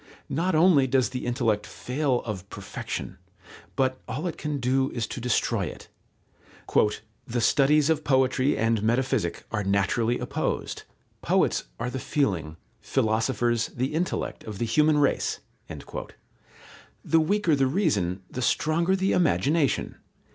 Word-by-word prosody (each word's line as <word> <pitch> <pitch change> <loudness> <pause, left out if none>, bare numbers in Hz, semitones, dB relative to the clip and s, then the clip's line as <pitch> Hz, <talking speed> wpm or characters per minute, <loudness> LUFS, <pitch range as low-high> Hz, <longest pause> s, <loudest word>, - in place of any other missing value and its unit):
Not 170 +5 0
only 155 -5 +5
does 130 0 +2
the 125 -1 -5
intellect 115 -4 0
fail 130 -1 -1
of 100 -4 -6
perfection, - - -6 0.6
but 130 -1 0
all 150 +7 -4
it 175 - -2
can 150 -2 -3
do 130 +2 +1
is 115 -3 -1
to 125 - -6
destroy 125 -1 +1
it. - - -9 1.4
"The 120 +1 -1
studies 145 +5 +4
of 160 -1 +1
Poetry 130 0 +2
and 115 -1 +1
Metaphysic 120 -4 0
are 105 -2 -1
naturally 100 +5 +1
opposed. - - -3 0.4
Poets - - +1
are 125 +2 -2
the 130 - -4
feeling, 95 - -1 0.2
philosophers 115 +1 +1
the 130 +4 -1
intellect 170 +3 -2
of 105 -2 -6
the 120 - -1
human 150 +6 +3
race." 145 -2 +1 1.6
The 165 - +3
weaker 180 0 +2
the 135 -1 +2
reason, 105 - 0
the 125 - -6
stronger 170 +8 +2
the 190 0 +1
imagination. 155 -3 +1
130 Hz, 135 wpm, -26 LUFS, 115-150 Hz, 1.6 s, only